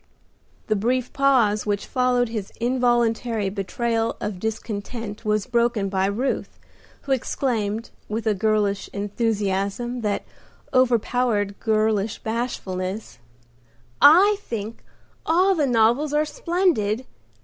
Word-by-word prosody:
The 215 - +1
brief 245 +4 0
pause 240 -7 +3
which 205 -1 -1
followed 250 -1 +1
his 215 -4 -5
involuntary 235 -3 +1
betrayal 225 +3 -1
of 205 -3 -4
discontent 220 0 -5
was 215 -2 0
broken 235 -4 +1
by 190 0 +1
Ruth, 235 +7 -2 0.4
who 275 - -6
exclaimed, 230 -4 -1 0.2
with 220 +2 -3
a 220 - +3
girlish 205 -1 0
enthusiasm 205 +2 -1
that 210 -2 -1 0.5
overpowered 240 -4 +1
girlish 215 -1 +1
bashfulness, 210 - -4 0.8
"I 380 +8 +7
think 225 - -6 0.4
all 365 +4 +3
the 305 -6 +1
novels 245 +5 +3
are 300 +1 +2
splendid! 300 - 0
225 Hz, 105 wpm, -23 LUFS, 205-250 Hz, 0.8 s, I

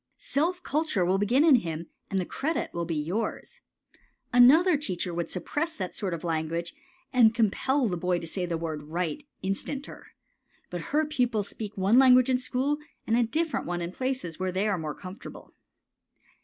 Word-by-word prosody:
Self 355 - -1
culture 295 - 0
will 190 +2 +2
begin 240 +8 +3
in 310 -6 +7
him 165 -5 -4 0.2
and 195 - 0
the 180 - -1
credit 315 - -2
will 170 0 -2
be 165 -1 -2
yours. 215 - -3 0.7
Another 305 +9 +7
teacher 185 -11 -3
would 170 0 -3
suppress 300 - -2
that 185 -2 -4
sort 185 -4 -2
of 160 - -9
language 165 +1 -2 0.4
and 230 -3 +5
compel 245 +4 +2
the 180 - -1
boy 180 +1 0
to 170 - -6
say 180 +2 -3
the 170 -1 -1
word 160 -2 -4
right 165 - -3 0.2
instanter. 195 +9 -4 0.6
But 175 -1 -4
her 305 +2 +2
pupils 245 -8 0
speak 215 -2 -7
one 200 +6 +4
language 255 -1 +6
in 250 - +2
school 265 +3 -1 0.3
and 225 - +2
a 240 - +4
different 310 +8 -1
one 175 0 -2
in 170 0 -4
places 255 -9 -3
where 185 0 -1
they 190 +4 0
are 200 -4 0
more 155 -2 -4
comfortable. 185 +1 -10
205 Hz, 180 wpm, -27 LUFS, 175-265 Hz, 0.7 s, in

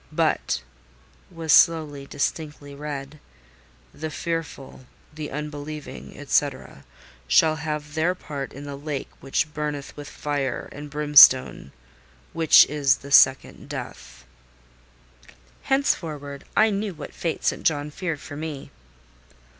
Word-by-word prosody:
But," - - 0 0.7
was 165 -3 0
slowly, 150 -5 +3
distinctly 145 0 -4
read, 145 0 -7 0.7
"the 160 +1 -5
fearful, 155 -5 -5 0.3
the 150 -1 -6
unbelieving, 150 +1 -7
&c., - - +3 0.8
shall 160 -1 +4
have 150 -1 -5
their 165 +4 +1
part 140 -6 -6
in 140 - -10
the 140 -1 -6
lake 145 0 -5
which 150 +3 -2
burneth 150 -2 -4
with 145 0 -9
fire 140 -4 -3
and 145 0 -9
brimstone, 145 - +6 0.6
which 165 -2 +7
is 140 -2 +2
the 140 - -9
second 135 -1 +4
death." 60 - -8 1.4
Henceforward, 150 - -1
I 220 0 +5
knew 200 -2 -3
what - - -9
fate 165 -2 -3
St. - - 0
John 150 -1 0
feared 165 -2 -4
for 145 - -9
me. 150 -2 -6
150 Hz, 115 wpm, -24 LUFS, 140-160 Hz, 1.4 s, which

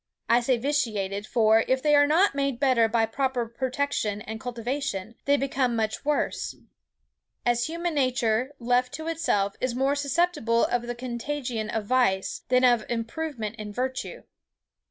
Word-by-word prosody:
I 235 - +5
say 245 +1 +1
vitiated; 215 -7 -1
for, 220 -1 +4
if 260 0 +2
they 300 -1 +3
are 290 0 +6
not 335 +5 +4
made 275 -3 -1
better 255 -5 +4
by 225 0 +2
proper 250 0 -1
protection 255 -4 -2
and 220 0 -6
cultivation, 245 -4 -3
they 285 0 +4
become 265 -3 0
much 220 -1 -1
worse; 295 0 -1 0.9
as 240 0 +2
human 335 +1 -2
nature, 255 -1 +1
left 245 +1 +1
to 315 - -7
itself, 250 -12 0
is 255 -2 -1
more 270 +2 +2
susceptible 285 -5 +1
of 240 -1 -1
the 240 - -3
contagion 240 -2 -4
of 220 -1 -2
vice, 205 -6 +1
than 250 0 +4
of 240 -3 +4
improvement 235 -1 -3
in 210 -2 -6
virtue. 260 - -4
250 Hz, 155 wpm, -26 LUFS, 225-280 Hz, 0.9 s, are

